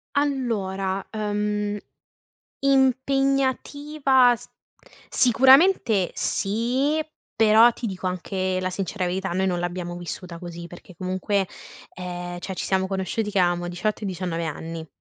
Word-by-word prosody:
Allora, 200 -9 -1
ehm, 210 -1 -1 0.8
impegnativa 270 0 +2
s - - -12 0.6
sicuramente 260 - +5
sì, 250 +9 0 0.4
però, 220 +2 +7
ti 235 - -5
dico 185 -2 -4
anche 185 +1 -2
la 185 0 -1
sincera 190 +1 -3
verità: 190 +1 -2
noi 190 +2 +1
non 175 -2 0
l'abbiamo 175 0 -4
vissuta 175 0 -7
così, 170 -1 -8
perché 175 +1 -13
comunque, 185 +1 -1 0.5
ehm, 175 -1 -6
cioè, 190 - -5
ci - - -4
siamo 190 0 +1
conosciuti 195 +3 -2
che 200 - 0
avevamo 175 -1 +1
18 180 +5 -2
e 205 - -2
19 175 -2 -3
anni, 160 +1 -5
195 Hz, 125 wpm, -24 LUFS, 180-245 Hz, 0.8 s, però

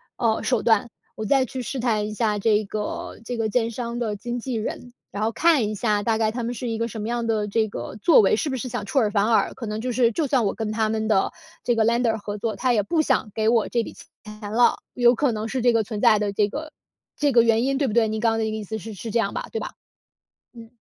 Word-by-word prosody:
呃， 225 -2 +1
手 250 -4 0
段， 225 0 +3 0.2
我 220 - -5
再 265 +3 +3
去 255 +1 -6
试 260 +2 -4
探 215 -4 0
一 215 - -6
下 210 -2 0
这 210 0 +2
个 210 +1 -5
这 245 +1 -4
个 220 -1 0
建 230 +1 +1
商 235 0 -4
的 220 -3 -2
经 240 +4 -4
纪 245 0 -4
人。 240 +2 -5 0.2
然 205 +2 -4
后 225 - +1
看 305 -5 +3
一 - - -3
下 210 -1 0
大 225 -1 +1
概 220 -1 +1
他 240 0 -4
们 235 - -2
是 245 +1 -5
一 225 -1 -2
个 230 +1 -1
什 220 0 -6
么 215 - -4
样 235 0 -2
的 215 -2 0
这 220 +2 +1
个 120 +5 -6
作 280 +9 +5
为， 205 0 +4
是 290 - -1
不 260 - -2
是 255 - -4
想 240 -4 -4
出 270 - +1
尔 215 -3 +2
反 200 0 +1
尔。 225 - +2
可 235 - -6
能 215 0 -4
就 255 - -2
是 240 -1 +3
就 300 +5 -1
算 255 -5 +2
我 195 - 0
跟 220 -1 -3
他 220 0 0
们 220 0 -1
的 200 -3 +2 0.3
这 240 - +1
个 220 -1 +2
lender 235 -1 +2
合 205 0 -6
作， 220 0 -2
他 255 -1 +1
也 210 -3 +2
不 320 - +1
想 260 -8 0
给 220 0 +1
我 230 -2 +2
这 235 - 0
笔 - - -8
钱 - - -14 0.5
了。 245 - +4 0.2
有 245 0 +4
可 270 0 +1
能 215 +1 -3
是 260 0 -2
这 240 -1 +4
个 225 -1 +2
存 210 0 -5
在 215 - +5
的 205 -1 -1
这 205 0 +2
个 305 +7 -6 0.5
这 290 -1 +2
个 235 - +7
原 230 0 +3
因， 270 +1 +1
对 275 -1 +1
不 210 - -2
对？ 230 -2 +3
您 215 +1 -3
刚 230 -1 +3
刚 225 - -1
的 220 - 0
意 215 0 -3
思 220 +2 -5
是 220 +1 -8
是 220 +3 -7
这 235 - +1
样 200 -2 0
吧， - - -5
对 225 - -2
吧？ - - -5 0.8
嗯。 230 -1 -12
225 Hz, 320 characters per minute, -24 LUFS, 215-240 Hz, 0.8 s, 个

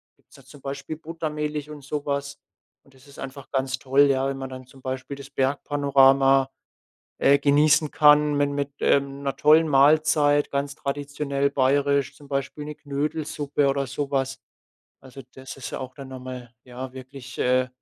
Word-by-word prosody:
Gibt's - - -24
da 135 - -17
zum 140 +1 -15
Beispiel 140 +3 -5
Buttermilch 150 -2 -4
und 145 -2 -10
so 145 +1 -4
was. 140 0 -3 0.4
Und 135 - -24
das 130 +2 -20
ist 140 - -16
einfach 135 0 -8
ganz 135 -1 -1
toll, 135 +1 +2
ja, 135 -1 +2
wenn 135 - -4
man 135 -1 -6
dann 130 -1 -9
zum 135 +1 -18
Beispiel 130 +1 -5
das 140 0 -11
Bergpanorama, 135 -1 +3 0.7
äh, 140 +1 +5
genießen 150 +1 +3
kann 150 -1 +5
min 145 0 +1
mit, 140 0 -2
ähm, 140 0 +1
'ner 135 -1 -2
tollen 155 +3 +5
Mahlzeit, 145 +1 +4
ganz 140 0 -2
traditionell 140 -1 -2
bayerisch, 140 0 +1
zum 145 - -15
Beispiel 140 +1 -3
'ne 150 0 -6
Knödelsuppe 145 0 -2
oder 140 0 0
sowas. 135 0 -2 0.6
Also, 130 +1 -12
das 130 0 -9
ist 135 - -7
ja - - -5
auch 130 -1 -7
dann 135 -2 -10
noch 130 -1 -8
mal, 125 -1 -8
ja, 125 +1 -8
wirklich, 130 -1 -11
äh, 125 0 +2
140 Hz, 170 wpm, -24 LUFS, 135-145 Hz, 0.7 s, äh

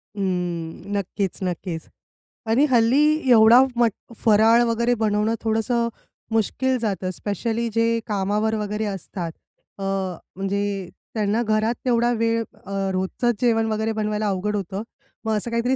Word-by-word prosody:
अं, 180 -2 -3
नक्कीच, 195 -1 -2
नक्कीच 175 -2 -3 0.7
आणि 255 +6 +4
हल्ली 265 +5 +3
एवढा 230 +2 +8
मट 235 -2 +3 0.3
फराळ 225 +2 +5
वगैरे 235 +1 +1
बनवणं 215 +1 +1
थोडंसं 230 +1 +1 0.4
मुश्कील 255 +4 +1
जातं, 195 -5 -2
स्पेशली 225 +5 -2
जे 230 0 +2 0.2
कामावर 210 +2 0
वगैरे 210 0 -2
असतात. 185 -3 -5 0.5
अ, 195 - -4 0.5
म्हणजे 195 -1 -2 0.2
त्यांना 215 +1 +1
घरात 220 +1 +1
तेवढा 240 -1 +3
वेळ 230 0 +1 0.2
अ, 195 - -9 0.2
रोजचंच 190 +6 0
जेवण 225 -2 +3
वगैरे 220 +1 0
बनवायला 215 0 -1
अवघड 200 +2 -1
होतं 200 +1 -3 0.4
मग 220 -1 +1
असं 235 +3 -3
काहीतरी 235 +3 +1
220 Hz, 130 wpm, -23 LUFS, 200-230 Hz, 0.7 s, एवढा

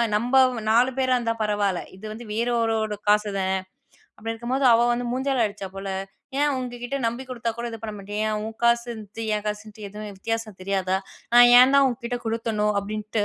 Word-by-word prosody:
நம்ப 240 +5 0 0.4
4 240 +3 +5
பேரா 260 -1 +2
இருந்தா 230 -2 -1
பரவால்ல. 205 -3 0 0.2
இது 195 +3 -12
வந்து 235 +2 -9
வேற 235 +3 0
ஒருவரோட 220 -2 0
காசு 210 0 +4
தான். 190 0 0 0.6
அப்படி 225 +2 -4
இருக்கும்போது, 245 +4 -2
அவ 235 +1 +4
வந்து 240 +1 -2
மூஞ்சால 265 -1 +1
அடிச்சா 200 -1 -6
போல, 195 0 -6 0.5
"ஏன் 295 +1 +3
உங்க 250 -1 -5
கிட்ட 245 +3 -2
நம்பி 235 +3 -3
குடுத்தா 235 -2 -2
கூட 240 - -3
இது 225 - -7
பண்ண 215 -1 -5
மாட்டியா? 200 +1 -7
ஏன் 215 - -1
உன் 220 0 -7
காசுன்னுட்டு 235 -3 0 0.2
என் 210 - -5
காசுன்ட்டு 210 0 -5
எதுவும் 210 +1 -8
வித்தியாசம் 225 -1 -3
தெரியாதா? 190 -1 0 0.4
நான் 240 0 +9
ஏன் 255 +2 +6
தான் 280 - +6
உங்க 240 -2 -3
கிட்ட 245 0 -2
கொடுத்தணோ?" 225 -2 -1
அப்படின்ட்டு. 210 +1 -2
225 Hz, 190 wpm, -24 LUFS, 210-240 Hz, 0.6 s, நான்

